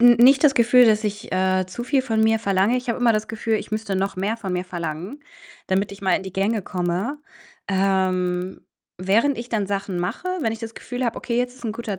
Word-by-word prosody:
n 240 0 +8
nicht 265 +4 +6
das 280 -2 +6
Gefühl, 245 +1 +6
dass 215 0 +3
ich, 205 -2 -4
äh, 185 0 +2
zu 215 +6 -6
viel 265 0 +1
von 225 -4 0
mir 220 0 +3
verlange. 200 +2 +2
Ich 250 -1 -5
habe 235 - 0
immer 240 -1 +4
das 215 0 -1
Gefühl, 225 0 -2
ich 215 - -3
müsste 215 -3 -2
noch 195 +1 -1
mehr 205 +4 -1
von 195 -5 -5
mir 180 0 -2
verlangen, 175 - -6 0.4
damit 190 +2 0
ich 200 - -11
mal 185 -2 +3
in - - -1
die 190 -1 -8
Gänge 200 +3 0
komme. 185 +10 -2 0.5
Ähm, 185 -2 0 0.3
während 225 +10 +2
ich 235 +1 -6
dann 210 -4 -1
Sachen 195 -2 -3
mache, 180 - -3
wenn 225 -5 0
ich 225 - -6
das 225 -1 -7
Gefühl 250 0 -5
habe, 235 - -1
okay, 235 - -3
jetzt 250 +1 -2
ist 255 - -16
'n 220 - -1
guter 215 -4 -5
215 Hz, 235 wpm, -22 LUFS, 190-235 Hz, 0.5 s, n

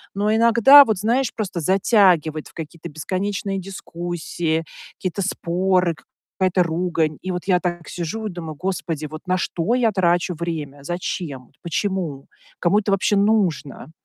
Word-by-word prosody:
Но 210 +2 +1
иногда 235 +5 +8
вот, 220 -6 -1
знаешь, 235 +6 +1
просто 195 -5 -3
затягивает 180 -4 +3
в - - -18
какие-то 165 +1 -8
бесконечные 195 +5 -3
дискуссии, 175 -3 -3 0.3
какие-то 185 +2 -3
споры, 180 -1 +1 0.5
какая-то 185 -1 +3
ругань. 165 -2 -1
И 185 - -4
вот 180 -1 -3
я 180 -2 +4
так 175 -2 -4
сижу 180 +6 -4
и - - -4
думаю: 165 -3 -7
"Господи, 165 -4 -3
вот 155 +5 -10
на 185 - +2
что 180 +6 -1
я 235 -3 +2
трачу 175 -2 +1
время? 155 -4 -5
Зачем? 155 -6 -5
Почему? 170 -5 -3 0.3
Кому 190 +4 +3
это 205 -1 -2
вообще 195 +1 +2
нужно?" 195 -9 0
180 Hz, 145 wpm, -22 LUFS, 165-200 Hz, 0.5 s, иногда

